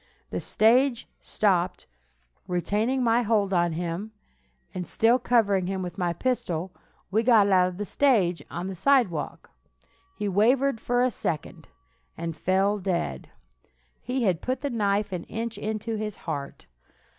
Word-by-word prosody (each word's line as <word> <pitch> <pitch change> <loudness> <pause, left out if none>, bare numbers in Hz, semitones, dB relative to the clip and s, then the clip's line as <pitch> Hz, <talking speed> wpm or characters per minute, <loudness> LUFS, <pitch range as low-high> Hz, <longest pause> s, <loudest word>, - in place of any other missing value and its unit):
The - - -2
stage 240 +3 +2
stopped. 185 -4 0 0.6
Retaining 210 +9 0
my 235 0 +3
hold 205 -4 +1
on 175 -2 +2
him, 175 +6 -4 0.6
and 180 -3 -5
still 230 +8 +3
covering 205 -7 +2
him 190 0 -2
with 180 +1 -7
my 175 -1 +1
pistol, 180 -4 -2 0.4
we 215 +3 +3
got 225 -4 +5
out 180 -1 +5
of 180 -1 -6
the 205 - -3
stage, 200 -9 +2
on 175 - -5
the 190 - -4
sidewalk. 210 - +1 0.6
He 210 - -3
wavered 230 +5 +2
for 245 0 +1
a 255 - +2
second, 160 -6 -4 0.5
and 165 -1 -4
fell 195 +5 +1
dead. 170 - -2 0.7
He 255 +1 -2
had 185 -6 +1
put 255 +1 -2
the 285 -1 -2
knife 205 -2 0
an 180 -2 -4
inch 230 +1 -4
into 220 +1 -3
his 210 -1 -4
heart. 145 -4 -5
205 Hz, 145 wpm, -26 LUFS, 180-230 Hz, 0.7 s, got